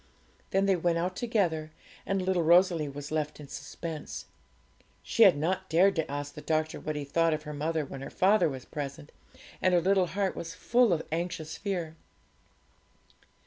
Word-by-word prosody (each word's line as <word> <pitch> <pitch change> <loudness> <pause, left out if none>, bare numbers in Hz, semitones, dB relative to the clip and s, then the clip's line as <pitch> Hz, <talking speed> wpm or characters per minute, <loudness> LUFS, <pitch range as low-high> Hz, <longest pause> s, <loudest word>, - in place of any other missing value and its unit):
Then 195 +1 +2
they 195 -1 +4
went 170 -1 +1
out 180 +2 -1
together, 180 -10 0 0.4
and 195 -1 0
little 185 -1 +1
Rosalie 170 -2 +4
was 145 +1 -8
left 150 -1 -2
in 145 - -9
suspense. 150 +3 -7 0.8
She - - -1
had - - +8
not 185 +5 -1
dared 185 +4 +4
to 160 -2 -1
ask 145 0 -4
the 150 - -9
doctor 155 0 -1
what 155 - -4
he 150 - -3
thought 165 +3 +2
of 155 - -7
her 150 -1 -6
mother 155 +1 -1
when 135 0 -8
her - - -6
father 190 -2 +3
was 130 -2 -7
present, 145 0 -6 0.5
and 185 -1 +3
her - - +5
little 190 0 +3
heart 195 +1 -1
was 165 0 -6
full 240 +1 +3
of 165 -2 0
anxious 160 -1 -3
fear. 175 -6 -3
165 Hz, 180 wpm, -29 LUFS, 150-185 Hz, 0.8 s, had